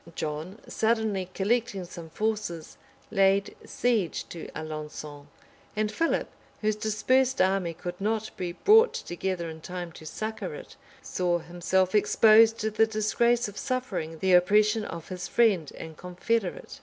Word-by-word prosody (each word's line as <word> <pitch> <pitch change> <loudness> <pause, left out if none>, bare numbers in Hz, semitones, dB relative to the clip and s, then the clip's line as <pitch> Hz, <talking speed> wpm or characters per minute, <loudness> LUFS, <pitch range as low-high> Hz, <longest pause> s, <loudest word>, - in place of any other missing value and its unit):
John, 155 +6 -4
suddenly 220 -5 0
collecting 205 -2 0
some 170 -2 -10
forces, 205 -5 -3 0.4
laid 195 -1 +2
siege 225 -8 0
to 170 - -7
Alençon; 150 -2 -7 0.5
and 215 0 0
Philip, 330 +6 0 0.3
whose 215 -1 +1
dispersed 255 +5 +1
army 185 -3 +1
could 180 +3 -7
not 220 +1 -1
be 175 -1 -4
brought 445 - +5
together 175 - -3
in 160 0 -8
time 180 0 -6
to 160 - -13
succor 220 - -4
it, - - -11 0.3
saw 175 -1 0
himself 175 +2 0
exposed 220 +1 +6
to 220 0 -1
the 220 +1 +3
disgrace 235 +2 +1
of 205 - -8
suffering 210 -12 -3
the 185 +3 +2
oppression 210 +4 +4
of 165 -1 -7
his 180 0 -5
friend 200 -11 +2
and 160 -1 -8
confederate. 180 +3 -3
195 Hz, 140 wpm, -27 LUFS, 175-220 Hz, 0.5 s, exposed